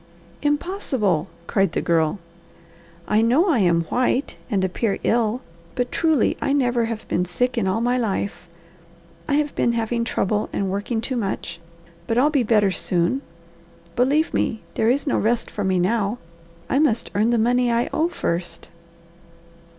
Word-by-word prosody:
"Impossible!" 290 - 0 0.2
cried 195 -3 +1
the - - 0
Girl. 165 +1 +1 0.9
"I 215 +1 +3
know 265 - +3
I 285 -8 +3
am 170 -3 +3
white 250 - 0
and 195 -5 +1
appear 195 +3 -1
ill, 230 +1 +1 0.3
but 245 -1 -1
truly 320 -3 +2
I 275 - +1
never 245 -4 +2
have 225 -1 -5
been 180 - 0
sick 245 +8 -1
in 225 -5 0
all 190 +4 0
my 245 +1 +1
life. 200 -5 -2 0.8
I 285 - +1
have 295 0 0
been 235 - +1
having 235 +1 -1
trouble 210 -2 -1
and 195 -1 -1
working 205 +4 -2
too 255 +2 -3
much, 195 -5 -3 0.5
but 225 - 0
I'll 285 +5 +4
be 285 -3 +2
better 210 -4 +3
soon. 180 +8 0 0.7
Believe 285 +6 +2
me, 220 - -1
there 220 - +1
is 275 +5 +1
no 280 - +1
rest 230 +2 0
for 205 - -3
me 190 -1 +1
now. 205 +4 +1 0.5
I 270 - +1
must 245 -7 +1
earn 215 +3 +2
the 240 - +2
money 245 +2 +2
I 235 +1 +1
owe 325 +2 +1
first." 175 - -3
230 Hz, 165 wpm, -22 LUFS, 195-255 Hz, 0.9 s, I'll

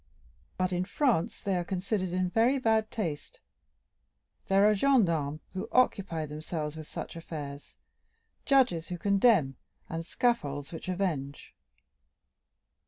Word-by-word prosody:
But 185 0 0
in 180 0 0
France 215 - 0
they 195 -2 0
are 175 - 0
considered 185 +2 -2
in 180 0 0
very 235 +6 +3
bad 220 -3 +2
taste; 170 -11 -4 1.1
there 195 +1 +5
are 215 - +5
gendarmes 170 - +2
who 195 +4 -4
occupy 195 -10 +2
themselves 150 0 -5
with 155 -1 -8
such - - -7
affairs, 145 -4 -8 0.7
judges 250 - +3
who 180 - -4
condemn, 195 - +3 0.3
and 165 0 -4
scaffolds 165 - -1
which 170 +2 -7
avenge." 165 -7 -3
185 Hz, 120 wpm, -29 LUFS, 155-215 Hz, 1.1 s, there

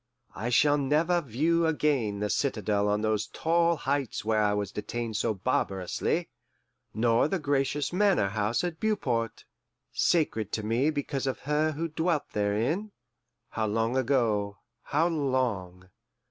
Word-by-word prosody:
I 115 - -3
shall 145 +4 +4
never 160 +5 +2
view 165 +6 +1
again 135 -10 0
the 105 - 0
citadel 105 -6 0
on 105 +1 +1
those 110 -1 0
tall 170 +5 +2
heights 140 -6 -2
where 110 -1 +2
I 105 -1 +3
was 100 -1 -2
detained 115 +2 -4
so 110 0 0
barbarously, 95 - -1 0.6
nor 115 +3 +2
the 190 - 0
gracious 145 0 0
Manor 190 - +3
House 105 - 0
at 175 -2 -3
Beauport, 125 - -1 0.5
sacred 115 - +1
to 110 - -1
me 120 +7 +2
because 145 -2 -2
of 130 - -2
her 150 +2 +1
who 165 +3 -2
dwelt 160 0 -1
therein 115 - 0 0.6
how 110 -1 -2
long 115 +3 0
ago, 115 -6 +1 0.3
how 160 +4 +2
long! 120 - -2
130 Hz, 140 wpm, -28 LUFS, 105-155 Hz, 0.6 s, shall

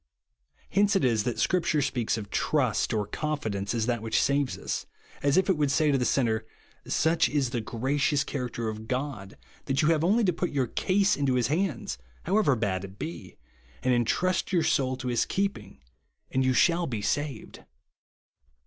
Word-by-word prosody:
Hence 205 +2 +3
it 190 - +3
is 115 -4 +2
that 120 - -1
Scripture 170 -4 +1
speaks 120 -5 -1
of 105 -2 -7
"trust" 130 -7 +1
or 105 -2 0
"confidence" 110 -5 -3
as 110 -1 0
that 120 -2 -1
which 110 0 +1
saves 140 -1 +1
us,* - - -4 0.3
as 140 +2 +2
if 190 - +3
it 190 -4 +2
would 145 -2 +1
say 150 +1 +3
to 140 - +3
the 125 - 0
sinner, 115 -5 +1 0.3
" - - -32
Such 160 +1 +2
is 140 -5 0
the 120 -3 -1
gracious 135 +6 0
character 125 -4 -4
of 110 0 -5
God, 125 -7 -4 0.3
that 140 +2 +1
you 150 - +4
have 160 -1 +2
only 215 +7 +3
to 180 -3 +2
put 175 +2 -2
your 135 -3 0
case 195 - +1
into 140 -3 +1
his 120 -1 +1
hands, 150 - -1 0.2
how 195 +5 +2
ever 145 -11 +3
bad 100 -4 -1
it 95 0 -10
be, 105 - -7 0.5
and 130 - +3
entrust 180 - +1
your 175 -4 +2
soul 130 -1 +1
to 125 - -5
his 120 -2 +2
keeping, 110 - -3 0.5
and 130 - +1
you 130 0 +2
shall 170 +4 +3
be 110 -5 -4
saved." 145 -3 -3
135 Hz, 190 wpm, -27 LUFS, 115-160 Hz, 0.5 s, you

